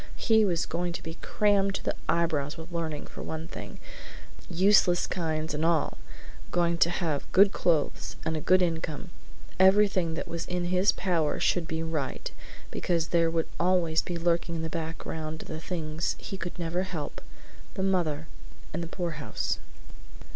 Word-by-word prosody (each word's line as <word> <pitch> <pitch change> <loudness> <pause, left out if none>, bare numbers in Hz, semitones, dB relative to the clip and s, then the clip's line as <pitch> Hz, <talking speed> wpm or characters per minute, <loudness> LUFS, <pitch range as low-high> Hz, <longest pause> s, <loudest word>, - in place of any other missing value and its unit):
He 220 -2 +4
was 175 -5 +1
going 175 0 -2
to - - -6
be 165 +1 -7
crammed 200 -2 +2
to - - -4
the - - 0 0.2
eyebrows 160 -3 +1
with 165 +2 -9
learning 160 -3 -3
for - - -9
one 160 +1 -5
thing, - - -8 0.7
useless 185 0 +4
kinds 160 -3 -2
and 150 +1 -1
all, 165 -2 +1 0.5
going 170 -1 +1
to 170 - +5
have 165 -5 -2
good 200 +1 +7
clothes, 160 -4 +1
and 160 - 0
a 155 - -2
good 185 +3 +5
income. 165 0 -2 0.5
Everything 190 -3 +5
that - - -4
was 165 0 -4
in 180 -1 -1
his 185 +3 +5
power 170 -5 0
should 170 -3 +1
be 160 0 -2
right, 155 -5 -3 0.4
because 165 -2 0
there 170 -1 +3
would 165 -1 0
always 175 -3 +3
be 175 - -4
lurking 170 0 +1
in 165 - -2
the 160 - -2
background 160 -1 -4
the 155 - -6
things 160 -1 -2
he - - -6 0.2
never 170 0 -1
could 190 - -1
help 165 -5 -5 0.5
the 190 - -1
mother 165 -5 +1 0.5
and 170 - -2
the 170 - -4
poorhouse. 165 -4 -2
170 Hz, 165 wpm, -28 LUFS, 160-180 Hz, 0.7 s, good